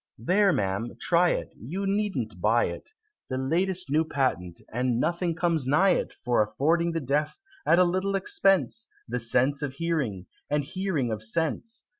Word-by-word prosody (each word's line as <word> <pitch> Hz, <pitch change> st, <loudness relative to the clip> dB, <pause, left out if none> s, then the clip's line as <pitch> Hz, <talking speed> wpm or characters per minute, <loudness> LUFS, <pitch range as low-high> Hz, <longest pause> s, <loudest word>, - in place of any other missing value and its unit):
"There, 190 Hz, -, +3 dB
Ma'am! 105 Hz, -, -2 dB
try 175 Hz, +1 st, +3 dB
it! -, -, -2 dB
You 180 Hz, -, -5 dB
needn't 205 Hz, 0 st, -2 dB
buy -, -, +3 dB
it -, -, -6 dB, 0.4 s
The 130 Hz, -, -2 dB
last 175 Hz, +5 st, -1 dB
New 155 Hz, +2 st, +3 dB
Patent 125 Hz, -, -1 dB
and 125 Hz, 0 st, 0 dB
nothing 170 Hz, +2 st, 0 dB
comes 165 Hz, -5 st, 0 dB
nigh 185 Hz, +8 st, +4 dB
it -, -, 0 dB
For 120 Hz, -3 st, +3 dB
affording 165 Hz, +10 st, +1 dB
the 165 Hz, -, 0 dB
Deaf, 145 Hz, +2 st, -1 dB, 0.3 s
at 170 Hz, -, +5 dB
a 180 Hz, -, +6 dB
little 185 Hz, +3 st, 0 dB
expense, 195 Hz, +3 st, +1 dB, 0.2 s
The 125 Hz, +1 st, -2 dB
sense 130 Hz, +5 st, +2 dB
of 145 Hz, -3 st, -3 dB
hearing, 140 Hz, -, -2 dB, 0.2 s
and 150 Hz, 0 st, +1 dB
hearing 155 Hz, -5 st, -2 dB
of 110 Hz, -1 st, -3 dB
sense! 160 Hz, -, -2 dB
155 Hz, 165 wpm, -27 LUFS, 125-180 Hz, 0.4 s, a